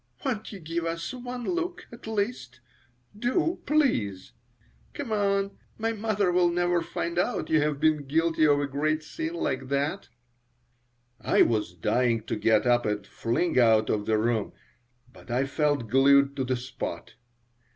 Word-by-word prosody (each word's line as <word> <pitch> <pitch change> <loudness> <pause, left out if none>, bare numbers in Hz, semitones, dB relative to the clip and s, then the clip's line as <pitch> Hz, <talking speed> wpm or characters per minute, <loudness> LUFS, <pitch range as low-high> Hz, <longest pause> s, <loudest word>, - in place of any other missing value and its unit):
"Won't 225 -5 -2
you 200 - -8
give 165 0 -3
us 165 +3 -3
one 250 0 -6
look, 350 +4 -3
at 235 -1 -11
least? 205 - -3 0.6
Do, 260 - 0
please! 115 - +1 0.6
Come, 200 -2 0 0.3
my 225 +1 -1
mother 210 -3 0
will 175 0 +3
never 175 0 +1
find 170 +1 -3
out 180 - -1
you 155 -1 +4
have 150 -1 0
been 155 -2 +2
guilty 160 +1 +2
of 145 -1 +4
a 145 - 0
great 155 +3 -1
sin 320 - -5
like 130 - -2
that." 140 +8 -2 1.1
I - - +4
was 105 -6 -1
dying 115 +5 +1
to - - -3
get 110 0 +2
up 120 0 +3
and 105 -1 -2
fling 130 - 0
out 110 -2 +4
of 105 -1 -1
the 110 - +3
room, 110 -1 0 0.6
but - - -16
I 125 +3 +1
felt 145 -3 0
glued 140 +3 +4
to 130 - 0
the 130 0 0
spot. 120 -8 -6
155 Hz, 155 wpm, -27 LUFS, 125-200 Hz, 1.1 s, you